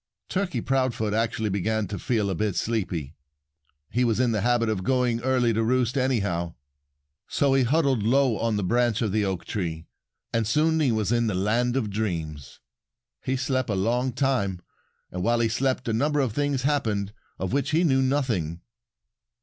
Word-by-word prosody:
Turkey 190 -2 -1
Proudfoot 130 -5 0
actually 110 -1 0
began 110 +3 0
to 100 +2 -5
feel 105 -5 0
a - - 0
bit 100 +1 -1
sleepy. 90 -10 -2 0.8
He 125 - +1
was 115 -2 +1
in 125 -2 +3
the 105 -2 0
habit 120 +1 +2
of 105 -4 -1
going 125 -1 +1
early 125 -2 +2
to 110 - +1
roost 125 +2 +1
anyhow. 100 -11 0 0.7
So 140 -2 +2
he 135 - +4
huddled 135 -1 +2
low 125 +2 +3
on 115 -1 0
the 105 - -1
branch 120 +3 +1
of 105 - 0
the 105 +1 +1
oak 95 -3 -2
tree. 85 -5 -3 0.5
And 115 -2 +1
soon 160 +6 +2
he 140 -5 +3
was 110 -2 0
in 120 -1 +2
the 105 - -1
land 120 +6 +1
of 110 -6 -1
dreams. 80 -9 -4 0.6
He 130 - 0
slept 130 -2 -1
a 105 - 0
long 120 +7 +1
time. 120 -9 0 0.5
And 90 - -4
while 120 +4 +2
he 115 -1 +2
slept 130 +2 -1
a 115 - 0
number 145 +6 +1
of 130 -6 0
things 145 -1 0
happened 110 -8 0 0.2
of 95 +4 -3
which 140 -2 0
he 165 +3 +2
knew 135 -5 +3
nothing. 115 - 0
115 Hz, 180 wpm, -25 LUFS, 105-130 Hz, 0.8 s, he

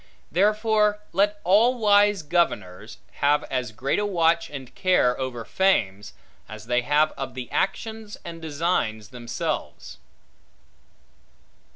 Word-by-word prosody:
Therefore 210 +2 +2
let 205 +3 +1
all 225 +7 +4
wise 205 -4 +3
governors 125 - -1 0.2
have 145 +1 +3
as 125 -4 -2
great 125 - -1
a 210 - 0
watch 170 -3 +1
and 135 -3 -9
care 185 -10 +2
over 125 -3 -4
fames, 105 - 0 0.4
as 110 0 -9
they 125 +1 +1
have 150 +4 +2
of 135 -1 -7
the 125 -2 -7
actions 220 +2 -3
and 165 -1 -8
designs 145 - -2
themselves. 120 -1 -5
160 Hz, 115 wpm, -24 LUFS, 125-205 Hz, 0.4 s, all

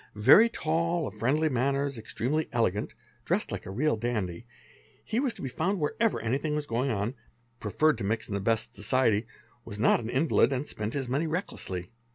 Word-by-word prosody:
Very 135 - +7
tall, 165 -3 0
of 100 - -5
friendly 135 +9 +1
manners, 140 +1 0
ex 110 -2 -8
tremely 150 +6 0
elegant, 105 -4 0 0.3
dressed - - -1
like - - -5
a - - -6
real 130 +8 +1
dandy, 110 -3 -3 0.6
he 225 - -1
was 265 -2 +1
to 195 - -9
be - - -2
found 180 +9 -1
wherever 215 +9 +1
tr - - -8
5 115 - +1
tything 150 -1 -1
was 150 -1 -2
going 125 +2 -1
on, 105 +1 -1 0.5
preferred 150 +9 +1
to - - -3
mix 110 +3 -1
in 105 - -5
the 100 - 0
best 110 +2 0
society, 110 0 +1 0.4
was 105 -3 -8
not 110 - +4
an 130 +7 0
lid, - - +4
and 135 +2 -2
spent 105 +3 -4
his 135 -3 -2
money 140 +6 0
recklessly. 95 - -4
130 Hz, 205 wpm, -28 LUFS, 110-155 Hz, 0.6 s, Very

